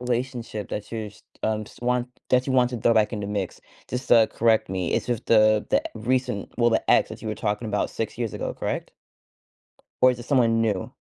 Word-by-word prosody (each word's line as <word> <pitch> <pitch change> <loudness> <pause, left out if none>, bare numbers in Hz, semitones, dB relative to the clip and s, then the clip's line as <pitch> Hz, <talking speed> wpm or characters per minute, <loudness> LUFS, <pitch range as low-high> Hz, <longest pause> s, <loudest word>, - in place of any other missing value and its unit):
relationship 120 -3 -3
that 105 - -5
you 110 -2 -4
just, 105 - -21 0.2
um 110 -1 0
just 120 - -16
want 125 0 0 0.2
that 125 +1 +3
you 130 - 0
want 125 -1 +4
to 120 - -4
throw 115 - +3
back 110 +1 +3
in 105 - -3
the 100 - -4
mix- 100 -3 -3 0.3
just 125 +1 -4
to 115 -2 +7
correct 110 -4 +2
me- 90 -3 -1
is - - 0
just 120 -1 -2
the 110 -1 +4
the - - +2
recent 125 -1 -1
well, 120 -1 +3
the 110 - +1
ex - - +4
that - - -8
you 110 - -5
were 105 - -2
talking 105 +3 -2
about 105 -1 -1
6 115 - -4
years 115 -4 -3
ago, - - -4
correct? - - -4 1.1
Or 130 - +8
is 125 - -5
it 120 - -7
someone 115 -5 +3
new? 105 -5 -1
115 Hz, 230 wpm, -25 LUFS, 105-125 Hz, 1.1 s, Or